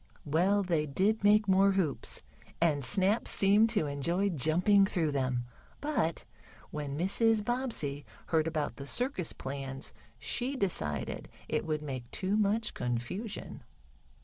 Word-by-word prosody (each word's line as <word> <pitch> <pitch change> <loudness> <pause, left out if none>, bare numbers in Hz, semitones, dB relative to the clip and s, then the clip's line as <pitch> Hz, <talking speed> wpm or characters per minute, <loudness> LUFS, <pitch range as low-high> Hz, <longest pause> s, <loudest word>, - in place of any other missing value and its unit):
Well, 185 +7 +2
they 165 -5 0
did 200 +10 +1
make 210 +1 +5
more 195 +1 +5
hoops, 180 -7 -1 0.4
and 150 -4 +2
Snap 200 - +2
seemed 205 +3 +4
to 210 -8 0
enjoy 170 +8 0
jumping 180 +6 +3
through 165 -6 0
them. 130 -3 -1 0.3
But 290 - -1 0.5
when 145 -2 -4
Mrs. 210 +5 +2
Bobbsey 225 - -1 0.2
heard 160 -1 +1
about 155 -3 -2
the 140 - -7
circus 245 - -1
plans 135 0 -6 0.2
she 260 +3 -2
decided 75 - -2 0.2
it - - -1
would 155 -1 -1
make 130 -4 -5
too 190 +2 -1
much 215 +1 +1
confusion. 125 - -4
175 Hz, 130 wpm, -31 LUFS, 145-205 Hz, 0.5 s, make